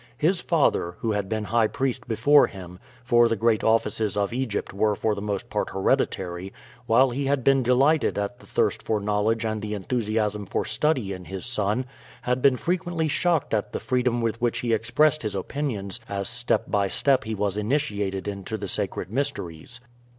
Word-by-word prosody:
His 175 +6 +1
father, 135 - +1
who 115 - 0
had 100 -2 -2
been 110 -1 -1
high 115 +1 +2
priest 135 0 -2
before 120 +6 +5
him 90 -2 -10 0.2
for 120 0 +5
the 115 - +1
great 115 0 +2
offices 110 -2 +1
of 100 +1 0
Egypt 125 -6 -2
were 105 +1 +1
for 110 +1 0
the 100 - -5
most 100 -2 -3
part - - -1
hereditary 95 -1 -1 0.4
while 125 +3 +4
he 135 +3 -2
had 140 -2 +1
been 135 +1 +4
delighted 135 +5 +3
at 105 +4 -3
the - - -17
thirst - - 0
for 110 -1 -1
knowledge 105 +2 0
and 110 -1 -2
the 105 0 -3
enthusiasm 105 -1 -1
for - - -1
study 130 -11 0
in 90 -1 -9
his 95 0 -5
son, 110 +1 -1 0.4
had 125 +1 0
been 135 -1 +4
frequently 175 -1 -1
shocked 165 -3 +1
at 105 -2 -1
the - - -2
freedom 125 -2 0
with 115 +1 -2
which 120 -1 0
he 120 -2 0
expressed 130 +8 +2
his 105 -3 -3
opinions 110 -1 -3
as 100 -1 -2
step 120 0 0
by 100 -1 +1
step 135 +6 +2
he 110 0 -4
was 100 -1 -1
initiated 105 -5 -1
into 100 +2 -4
the 105 - -5
sacred 100 0 -2
mysteries. 125 - -4
110 Hz, 185 wpm, -25 LUFS, 100-130 Hz, 0.4 s, before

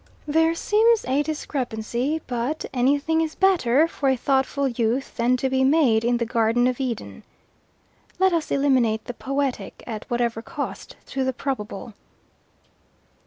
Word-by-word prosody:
There 325 +2 +3
seems 445 +5 +3
a 265 +3 +1
discrepancy, 270 -1 -3
but 250 +5 -2
anything 285 +5 +2
is 320 -1 -2
better 330 -7 +3
for 285 -4 -1
a 265 - +2
thoughtful 270 +2 +1
youth 240 +2 -1
than 245 +1 +2
to 265 - 0
be 265 0 +1
made 265 -6 +4
in 240 +1 +2
the 235 - -1
Garden 230 +1 +2
of 255 0 0
Eden. 250 -5 -4 1.0
Let 380 -1 +3
us 330 -2 -1
eliminate 255 -6 +2
the 245 - -5
poetic, 270 -5 -3
at 220 -3 -7
whatever 235 -2 -1
cost - - -6
to 270 -1 -2
the 260 0 0
probable." 230 -5 -5
265 Hz, 145 wpm, -23 LUFS, 235-290 Hz, 1.0 s, made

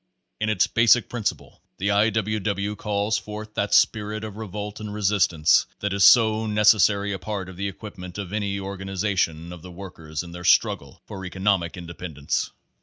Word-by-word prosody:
In 110 - 0
its 105 -4 +3
basic 115 +1 +4
principle 120 -4 -4 0.2
the 100 +2 0
I. 105 +2 +4
W. 110 0 -1
W. 100 +1 -2
calls 105 +1 -1
forth 105 0 -8
that 100 -1 -1
spirit 105 0 +2
of 105 -2 -7
revolt 105 -1 -6
and 105 -1 -6
resistance 95 -6 +3
that 105 -1 -2
is 100 -1 +2
so 110 0 +6
necessary 105 -1 +4
a 95 - -5
part 100 0 -4
of 95 - -10
the 100 +2 -3
equipment 95 -2 -9
of 100 -2 -6
any 100 -2 -2
organization 95 -4 -2
of 85 - -11
the 90 - -11
work; 90 +1 -10
ers 80 0 -5
in 85 - -10
their 90 0 -8
struggle 85 - +2
for 95 - -8
economic 95 -2 0
independence. 85 -4 -4
100 Hz, 180 wpm, -24 LUFS, 90-105 Hz, 0.2 s, so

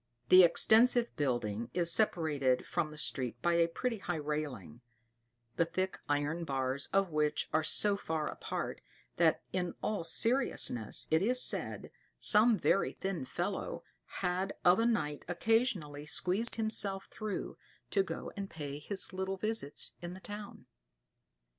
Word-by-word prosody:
The 185 - +9
extensive 230 +7 +5
building 120 -5 -2
is 170 -2 +4
separated 150 -11 +2
from 155 - -1
the 155 - -11
street 125 -5 -1
by 175 - +3
a 170 0 +3
pretty 230 +6 -3
high 175 -2 -3
railing, 145 - -5 0.8
the 165 - +3
thick 185 +2 -3
iron 145 +4 0
bars 135 -2 -2
of 195 -2 +2
which 150 -1 0
are 155 - +3
so 205 +6 +2
far 160 -5 -3
apart, - - -5 0.4
that - - +3
in 180 -2 -2
all 210 -5 -1
seriousness, 225 - +1
it 160 +1 +4
is 250 +5 +2
said, - - -1 0.3
some 220 +1 +4
very 195 - +1
thin 190 -8 -4
fellow - - -4 0.4
had 185 +2 -1
of 180 +3 +6
a 230 - +3
night 150 -11 -1
occasionally 175 - 0
squeezed 190 +9 +1
himself 205 -3 -1
through 215 -2 -5 0.3
to 200 - +3
go 190 - -5
and 195 -1 -5
pay 145 -2 -6
his 195 +5 -2
little 190 +1 -3
visits 215 -7 -1
in 175 +1 -6
the - - -10
town. 205 +1 -9
175 Hz, 145 wpm, -32 LUFS, 150-205 Hz, 0.8 s, The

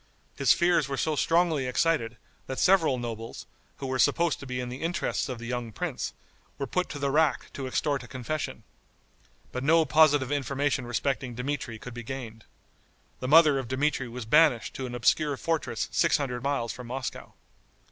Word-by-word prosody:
His - - +3
fears 170 -5 +3
were 135 - -2
so 155 +3 0
strongly 165 -4 +2
excited, 125 -4 +1 0.3
that 130 - -4
several 175 -8 +4
nobles, 115 -2 -6 0.3
who - - -6
were 130 0 -2
supposed 170 +2 +2
to 140 - -9
be 125 0 -3
in 125 -1 -4
the 125 +2 -7
interests 170 -3 -1
of 125 - -4
the 120 - -8
young 120 -1 -3
prince, - - -3 0.5
were 140 - -2
put 180 +7 -1
to - - -5
the 140 -1 -1
rack 155 -1 +1
to 135 -2 -5
extort 140 +2 0
a 125 - -11
confession. 130 +6 -4 0.9
But 125 - -4
no 160 +2 +4
positive 145 -3 +4
information 140 -2 -1
respecting 130 0 -2
Dmitri 125 -2 -3
could 125 +2 -9
be 120 - -6
gained. 115 -3 -7 0.7
The 130 - -4
mother 150 -1 +6
of 130 - -5
Dmitri 135 0 0
was 120 0 -7
banished 145 -1 +4
to 130 - -4
an 120 - -6
obscure 140 +4 +2
fortress 165 +1 -1
six 165 -1 +3
hundred 125 -4 -3
miles 135 -4 -1
from 125 -1 -9
Moscow. 130 +1 -6
135 Hz, 180 wpm, -28 LUFS, 125-150 Hz, 0.9 s, mother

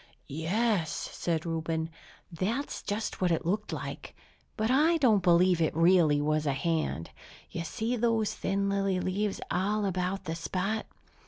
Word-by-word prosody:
"Yes," 175 +4 0 0.2
said 165 -2 -1
Reuben, 160 0 -2 0.4
"that's 220 - -2
just 210 0 -3
what 180 - +3
it 165 -2 0
looked 210 +5 -1
like. - - -6 0.4
But 220 +2 +1
I 310 +5 +4
don't 230 -9 +4
believe 175 0 +4
it 160 - +1
really 165 -3 +5
was 155 +1 0
a 140 - +2
hand! 155 - -1 0.4
You 170 - -3
see 225 +8 -2
those 225 -2 +1
thin 200 0 -1
lily 195 -1 +1
leaves 195 +3 -1
all 205 +3 +1
about 185 +1 -1
the 165 -3 -3
spot? 185 +7 -2
185 Hz, 150 wpm, -29 LUFS, 165-210 Hz, 0.4 s, really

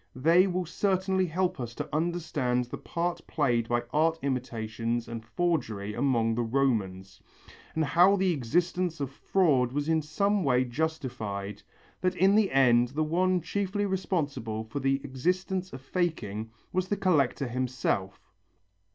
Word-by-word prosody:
They 165 +8 +4
will 180 -1 -1
certainly 190 +1 0
help 180 0 -1
us 120 -1 -5
to - - -4
understand 155 -7 0
the 120 - -7
part 175 0 -2
played 120 -7 +1
by 120 0 +1
art 160 +2 +3
imitations 120 -3 -2
and 115 -1 -6
forgery 115 - -1
among 120 -2 +1
the 120 - 0
Romans, 110 -7 -1 0.5
and 160 -1 +1
how 175 +7 +5
the 190 -2 +2
existence 170 +4 0
of 140 -2 -3
fraud 140 -6 +2
was 145 +2 -2
in 160 -1 +2
some 200 +6 0
way 130 -3 +3
justified, 120 -8 -3 0.4
that 185 0 +1
in 190 +2 +4
the 210 -2 +4
end 125 -3 +4
the 145 +5 -1
one 180 +3 +1
chiefly 200 +3 -1
responsible 145 - -2
for 110 +6 -5
the 135 0 +2
existence 180 +7 -1
of 130 - -8
faking 130 - -2 0.2
was 185 0 0
the 205 - -1
collector 150 -8 +2
himself. 120 -6 -2
145 Hz, 145 wpm, -28 LUFS, 120-180 Hz, 0.5 s, how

